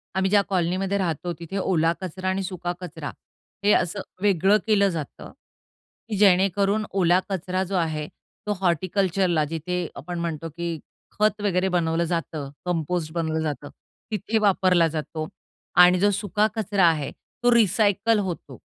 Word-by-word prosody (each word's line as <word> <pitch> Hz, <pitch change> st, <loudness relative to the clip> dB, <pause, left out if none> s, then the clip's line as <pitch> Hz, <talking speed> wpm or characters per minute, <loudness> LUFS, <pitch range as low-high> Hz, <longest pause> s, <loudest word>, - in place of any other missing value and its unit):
आम्ही 190 Hz, 0 st, +1 dB
ज्या 205 Hz, -1 st, +6 dB
कॉलनीमध्ये 185 Hz, +2 st, 0 dB
राहतो, 175 Hz, -2 st, -2 dB
तिथे 170 Hz, +3 st, -5 dB
ओला 170 Hz, -4 st, +2 dB
कचरा 185 Hz, +1 st, -3 dB
आणि 190 Hz, +1 st, -1 dB
सुका 180 Hz, -2 st, -4 dB
कचरा 160 Hz, -4 st, -6 dB, 0.5 s
हे 205 Hz, -, +4 dB
असं 190 Hz, +4 st, +1 dB, 0.2 s
वेगळं 195 Hz, 0 st, +4 dB
केलं 200 Hz, -2 st, +4 dB
जातं, 160 Hz, -7 st, -6 dB, 0.8 s
की 215 Hz, -, -2 dB
जेणेकरून 200 Hz, +2 st, +3 dB
ओला 180 Hz, -2 st, +3 dB
कचरा 185 Hz, 0 st, -1 dB
जो 190 Hz, +1 st, -4 dB
आहे 155 Hz, -4 st, -1 dB, 0.4 s
तो 210 Hz, -, +1 dB
हॉर्टिकल्चरला 185 Hz, -1 st, +1 dB
जिथे 165 Hz, +3 st, -3 dB
आपण 175 Hz, -1 st, -6 dB
म्हणतो, 165 Hz, -1 st, -3 dB
की 170 Hz, 0 st, -4 dB, 0.4 s
खत 215 Hz, 0 st, +2 dB
वगैरे 190 Hz, -2 st, +1 dB
बनवलं 170 Hz, -2 st, +1 dB
जातं, 160 Hz, -4 st, -3 dB, 0.2 s
कंपोस्ट 165 Hz, -2 st, -1 dB
बनवलं 160 Hz, -2 st, -1 dB
जातं, 150 Hz, -2 st, -4 dB, 0.4 s
तिथे 215 Hz, +2 st, -1 dB
वापरला 185 Hz, -4 st, +3 dB
जातो 155 Hz, 0 st, -4 dB, 0.6 s
आणि 180 Hz, 0 st, +5 dB
जो 205 Hz, -, +4 dB
सुका 205 Hz, +1 st, +1 dB
कचरा 200 Hz, -4 st, +2 dB
आहे 155 Hz, -4 st, +2 dB, 0.3 s
तो 245 Hz, -, +5 dB
रिसायकल 215 Hz, 0 st, +3 dB
होतो. 175 Hz, -, -5 dB
180 Hz, 145 wpm, -24 LUFS, 165-195 Hz, 0.8 s, ज्या